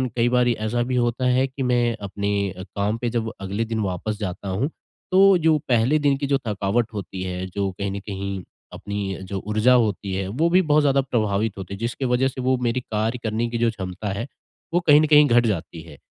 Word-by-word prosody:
कई 120 0 +2
बारी 125 -1 +3
ऐसा 110 +2 -2
भी 125 +1 -2
होता 120 +1 0
है 125 +1 +3
कि 135 +1 -5
मैं 120 -2 +1
अपने 100 0 -3 0.2
अ, 95 0 -8
काम 100 +3 -2
पे 120 0 -2
जब 115 -1 -2
अगले 100 +4 -2
दिन 115 0 -3
वापस 100 +3 -3
जाता 100 -1 -5
हूँ, 105 +10 -1 0.4
तो 195 0 +6
जो 160 -2 +3
पहले 125 +5 +3
दिन 145 -2 +2
की 140 0 -3
जो 140 0 +2
थकावट 105 +3 -1
होती 95 -2 -6
है, 90 0 -4
जो 95 +1 -2
कहीं 100 +1 -4
न 100 - -4
कहीं, 100 -1 -5 0.3
अपनी 100 -2 -4
जो 95 +1 -5
ऊर्जा 110 +4 +3
होती 105 -5 +1
है, 95 0 -2
वो 145 - +1
भी 180 +2 +5
बहुत 155 -3 +3
ज़्यादा 140 -1 +3
प्रभावित 110 -5 -1
होती 95 0 -7
है। - - -5
जिसके 120 +4 -3
वजह 125 +1 +2
से 130 0 -5
वो 130 +1 +2
मेरी 120 +1 0
कार्य 110 +1 -2
करने 110 +2 -1
की 120 - -3
जो 115 0 +2
क्षमता 95 0 -5
है, 110 +4 -3 0.5
वो 175 - +4
कहीं 150 -1 +8
न - - +3
कहीं 150 -1 +7
घट 120 -1 +4
जाती 85 -6 -3
है, 80 -3 -13
115 Hz, 225 wpm, -23 LUFS, 100-125 Hz, 0.5 s, कहीं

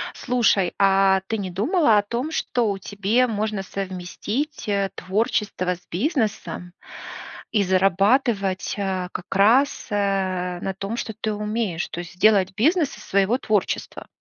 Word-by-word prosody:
Слушай, 225 -7 +2
а 195 -1 +4
ты 225 - -1
не 195 -3 -4
думала 230 - +3
о - - +5
том, 240 +8 -3
что 240 -7 0
у 200 - -3
тебе 205 +6 +1
можно 215 -2 -2
совместить, 195 - -4
э, 200 -1 +1
творчество 190 -1 -1
с 175 - -22
бизнесом 205 - -2 0.8
и 210 - +2
зарабатывать, 195 +2 +2
а, 190 -2 -2
как 175 - -6
раз, 235 +8 +3
э, 190 -3 -1
на 195 - -2
том, 195 +4 -5
что 220 - -4
ты 215 -1 -1
умеешь, 210 -4 -2
то 170 - -6
есть 175 0 -8
сделать 195 -1 +4
бизнес 300 - +2
из - - -12
своего 200 +5 +2
творчества? 215 -6 -2
200 Hz, 145 wpm, -23 LUFS, 190-225 Hz, 0.8 s, о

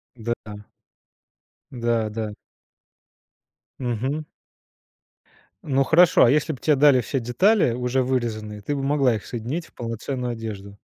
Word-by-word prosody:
Да-да. 110 -3 -6 1.0
Да, 115 -3 0
да. 110 -1 -4 1.5
Мгм. 130 +5 -2 1.4
Ну, 135 -2 +2
хорошо, 165 +5 +5
а 120 - +4
если 150 +1 +1
б 130 - -10
те 150 - +3
дали 140 -2 +5
все 135 +4 -2
детали, 170 - +3
уже 125 +1 0
вырезанные, 110 -5 -3
ты 145 +8 -3
бы 135 - -3
могла 135 -4 +2
их 105 - -7
соединить 125 +9 -4
в - - -21
полноценную 120 +2 -4
одежду? 100 -3 -7
125 Hz, 125 wpm, -23 LUFS, 115-140 Hz, 1.5 s, хорошо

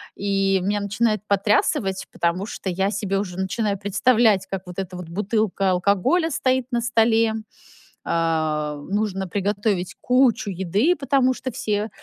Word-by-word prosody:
И 195 -1 +1
меня 205 +1 0
начинает 215 0 0
потрясывать, 200 - +1
потому 170 +3 -1
что 205 - -5
я 190 +3 0
себе 200 -1 -1
уже 185 -3 -5
начинаю 200 +1 -1
представлять, 205 0 +3
как 190 -1 -4
вот 180 - -9
эта 185 -1 -5
вот 180 -2 -8
бутылка 200 0 0
алкоголя 200 - +2
стоит 260 -1 0
на 240 -1 0
столе, 225 -1 +3 0.7
а, 155 -2 0
нужно 195 -2 -1
приготовить 200 0 -1
кучу 250 -4 +2
еды, 195 - +1
потому 270 -2 +2
что 260 0 -5
все 215 -2 -2
200 Hz, 140 wpm, -23 LUFS, 190-225 Hz, 0.7 s, представлять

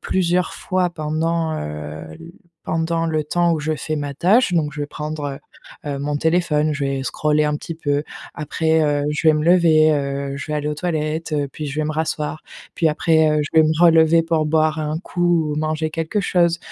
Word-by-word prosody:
plusieurs 180 -1 0
fois 185 -1 -1
pendant, 160 +1 -1
heu, 75 +1 -6
l 165 - -12 0.3
pendant 165 0 -1
le 155 -2 -1
temps 175 +3 +1
où - - -2
je 155 +1 -1
fais 155 +1 -4
ma 145 -1 -4
tâche. 195 - +3
Donc 150 -4 0
je 150 - -6
vais - - -3
prendre, 150 0 -5 0.6
heu, - - -5
heu, 140 - -3
mon 145 +1 -2
téléphone, 160 -2 +1
je 140 -1 -2
vais 135 -1 -2
scroller 150 +2 +1
un 150 0 0
petit 165 - -7
peu, 145 -2 -1 0.3
après, 160 +1 0
heu, 145 -1 +1
je 150 +2 -2
vais 155 - +6
me 155 0 -1
lever, 165 -3 +5
heu, 140 -1 -2
je 145 - -6
vais 150 - -3
aller 150 0 -2
aux 150 - -2
toilettes, 155 -1 -3
heu, 145 -2 0
puis 150 - -5
je 145 +2 -3
vais - - -1
me - - -2
rasseoir, 155 -1 -2 0.4
puis 165 - +3
après, 160 0 +3
heu, 150 0 +2
je 145 - -6
vais - - +5
me 155 - +2
relever 165 -1 +5
pour 160 -2 0
boire 155 0 +1
un 155 +1 -2
coup 175 -4 0
ou - - -4
manger 155 0 -1
quelque 165 +6 -2
chose. 170 -3 +2
155 Hz, 215 wpm, -20 LUFS, 150-165 Hz, 0.6 s, vais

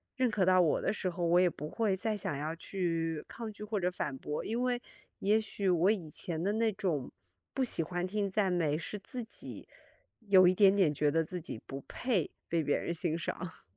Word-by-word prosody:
认 255 -2 +2
可 210 -4 +1
到 185 0 +6
我 160 - +3
的 - - +1
时 190 -3 -1
候， 175 0 -2
我 170 +1 +5
也 180 -1 +5
不 150 -2 -6
会 200 +2 0
再 220 +2 -1
想 150 -8 -2
要 155 +3 -3
去 165 -3 -2
抗 230 -2 -6
拒 210 - -9
或 210 0 -2
者 180 -1 +1
反 145 -6 -3
驳。 150 +3 -4
因 230 +3 -1
为 250 -1 +1 0.4
也 210 +3 +3
许 205 -2 -3
我 180 +1 +4
以 170 -8 -3
前 165 +1 -3
的 200 +2 +1
那 225 0 +2
种 170 -9 -2 0.4
不 270 - +2
喜 240 - +2
欢 175 +2 -2
听 200 +1 -1
赞 195 -1 +1
美， 160 -4 +1
是 175 +6 -5
自 245 +4 -5
己 225 - -8 0.6
有 185 -2 +7
一 180 - +5
点 195 0 +6
点 190 -7 +4
觉 145 0 +2
得 165 +1 +2
自 180 +3 -5
己 120 -8 -7
不 135 0 -6
配 225 - -1 0.2
被 165 -1 +1
别 145 - +2
人 170 - -2
欣 165 -1 -1
赏。 170 +1 -5
185 Hz, 240 characters per minute, -32 LUFS, 165-210 Hz, 0.6 s, 有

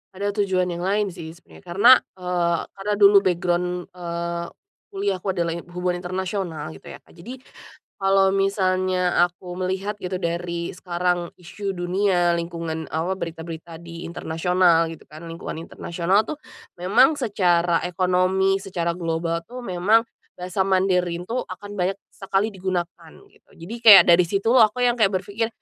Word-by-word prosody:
Ada 200 +2 -2
tujuan 185 -2 0
yang 175 0 -5
lain 200 +1 0
sih 160 -1 -9
sebenarnya, 175 - -18
karena, 195 +7 +5 0.2
eee, 175 -2 0
karena 200 +2 -3
dulu 200 0 +7
background 180 -1 0 0.2
eee, 170 -1 -4 0.4
kuliahku 195 -1 -3
adalah 170 -2 -1
in 170 +1 -7
hubungan 180 0 -2
internasional 180 -4 -4
gitu - - -14
ya - - -9
Kak, - - -23
jadi, 195 +10 -10 0.6
kalau 195 0 +3
misalnya 185 -2 +1
aku 175 0 -4
melihat 190 +3 -3
gitu 180 0 -3
dari 170 0 -3
sekarang 175 -1 -2
isu 195 +3 -5
dunia, 175 -1 +1
lingkungan 165 -2 -5
awa 165 +5 -1
berita-berita 165 -1 -7
di 170 0 -9
internasional 165 0 +1
gitu 165 - -12
kan, 155 +2 -12
lingkungan 165 0 -7
internasional 185 +6 -1
tuh, - - -4 0.4
memang 225 - +4
secara 175 -9 +1
ekonomi, 185 +2 +1
secara 180 -3 -2
global 165 -1 -2
tuh 250 0 -8
memang, 200 +3 +2 0.3
bahasa 185 +2 -2
Mandarin 180 -2 +1
tuh 235 +7 -4
akan 205 -1 -8
banyak 185 +2 0 0.2
sekali 195 +1 -1
digunakan, 175 -4 -4 0.2
gitu. - - -28
Jadi 175 +8 -8
kayak 220 -4 +10
dari 175 0 +5
situ 200 +5 0
aku 245 0 +4
yang 240 0 +2
kayak 215 - +5
berpikir, 210 +4 -3
180 Hz, 150 wpm, -23 LUFS, 170-195 Hz, 0.6 s, kayak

